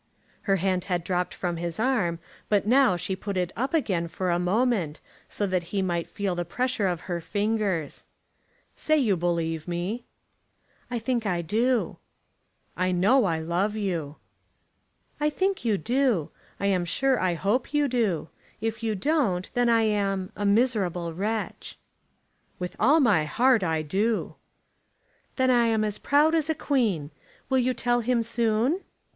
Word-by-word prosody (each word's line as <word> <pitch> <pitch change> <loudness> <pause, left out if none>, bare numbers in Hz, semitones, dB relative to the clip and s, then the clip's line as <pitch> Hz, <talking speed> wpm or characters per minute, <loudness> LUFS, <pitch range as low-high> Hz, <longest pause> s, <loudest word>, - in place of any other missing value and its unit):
Her 195 - +5
hand 185 -1 0
had 175 -3 -1
dropped 180 0 -1
from 175 -2 -3
his 170 +1 -4
arm, 220 -9 +1 0.3
but 205 -2 +2
now 250 -4 +4
she 190 +2 -3
put 195 0 -4
it 180 -1 -1
up 260 +6 -1
again 195 - 0
for 175 +2 -2
a 175 - +1
moment, 185 -4 0 0.3
so 205 - -2
that 185 -2 0
he 195 0 -1
might 175 -2 -2
feel 200 -2 -2
the 175 0 -2
pressure 245 +3 -1
of 175 -2 -2
her 175 -2 -4
fingers. 205 -5 -1 0.7
"Say 310 - +1
that 295 - +3
you 205 -5 +2
believe 165 -2 -1
me." 175 +7 -3 0.8
"I 245 - -2
think 235 -1 -1
I 175 -3 0
do." 230 +7 0 0.8
"You 185 0 0
know 210 +8 +4
I 165 -3 0
love 180 +6 -1
you." 170 -8 -2 1.0
"I 300 0 +2
think 380 +2 -1
you 220 -4 +2
do. 235 - +1 0.3
I - - -2
am 190 -3 +2
sure 260 +9 +1
I 180 -2 +1
hope 205 - 0
you 295 -1 +2
do. 215 - 0 0.3
If 225 0 -3
you 220 -2 -1
don't, 200 - 0
then 245 -1 +2
I 230 -1 +4
am 195 -3 0
a 205 - -1
miserable 200 -7 +1
wretch." 215 +5 -3 0.8
"With 180 0 -5
all 285 +9 +5
my 205 - +3
heart 240 +9 +3
I 160 -2 0
do." 210 +8 0 1.0
"Then 260 -1 +3
I 240 -2 +4
am 220 -1 +2
as 210 -1 -2
proud 295 +3 +3
as 320 -1 +1
a 320 - +1
queen. 210 - 0 0.4
You 260 -1 +3
will 255 +1 +1
tell 240 +1 +1
him 235 0 +1
soon?" 230 - +1
205 Hz, 165 wpm, -26 LUFS, 175-245 Hz, 1.0 s, Her